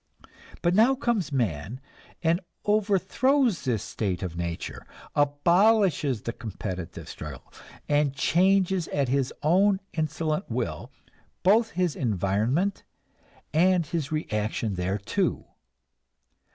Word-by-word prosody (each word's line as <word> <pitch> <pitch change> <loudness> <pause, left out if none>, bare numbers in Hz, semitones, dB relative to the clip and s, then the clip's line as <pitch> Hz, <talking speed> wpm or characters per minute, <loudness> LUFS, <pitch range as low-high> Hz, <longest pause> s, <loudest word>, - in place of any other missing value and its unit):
But 175 0 +3
now 230 +7 +5
comes 235 - -1
man 110 - -2 0.4
and 170 +3 +2 0.2
overthrows 215 +3 +2
this 115 -6 0
state 95 -4 -3
of 85 -3 -4
nature, 85 -1 -5 0.3
abolishes 150 - +3
the 115 - -3
competitive 90 -7 -6
struggle, 75 -6 -9 0.3
and 145 -2 +2
changes 185 +4 +2
at 140 -3 -1
his 135 -1 +1
own 190 +5 +4
insolent 160 +2 -2
will 115 -10 -3 0.5
both 220 +5 +4
his 180 -4 +1
environment 115 - 0 0.7
and 175 +1 +4
his 155 -2 -3
reaction 110 -7 -2
thereto. 95 +3 -1
150 Hz, 100 wpm, -26 LUFS, -, 0.7 s, now